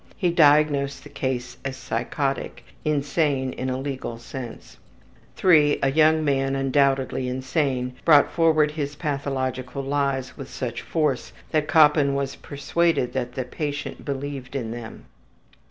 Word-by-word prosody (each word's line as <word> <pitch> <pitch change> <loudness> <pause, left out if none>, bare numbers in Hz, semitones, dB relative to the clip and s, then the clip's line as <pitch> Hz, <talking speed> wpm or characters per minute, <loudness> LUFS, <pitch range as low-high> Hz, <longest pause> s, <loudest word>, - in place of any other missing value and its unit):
He 180 -4 +1
diagnosed 145 -3 +3
the - - -11
case 125 -2 -3
as 135 -1 -4
psychotic; 130 +3 -3 0.2
insane 145 -2 0
in 130 - -3
a 130 - -1
legal 130 -3 -4
sense. 120 0 -9 0.7
III. 150 -5 +6
A 135 - +3
young 155 +1 +4
man 135 -1 +1
undoubtedly 135 -1 +1
insane 130 -1 -1
brought 150 -3 +6
forward 155 -3 +3
his 145 -2 -4
pathological 135 -3 -3
lies 135 -2 -1
with 135 - -8
such 125 -1 -4
force 150 -6 -1 0.2
that 155 -2 +1
Koppen 150 -3 +5
was 140 -1 -2
persuaded 145 -1 0
that 125 -2 -3
the 130 - -2
patient 145 +3 -5
believed 140 -1 -5
in 115 -5 -3
them. 115 -1 -8
140 Hz, 135 wpm, -24 LUFS, 130-150 Hz, 0.7 s, III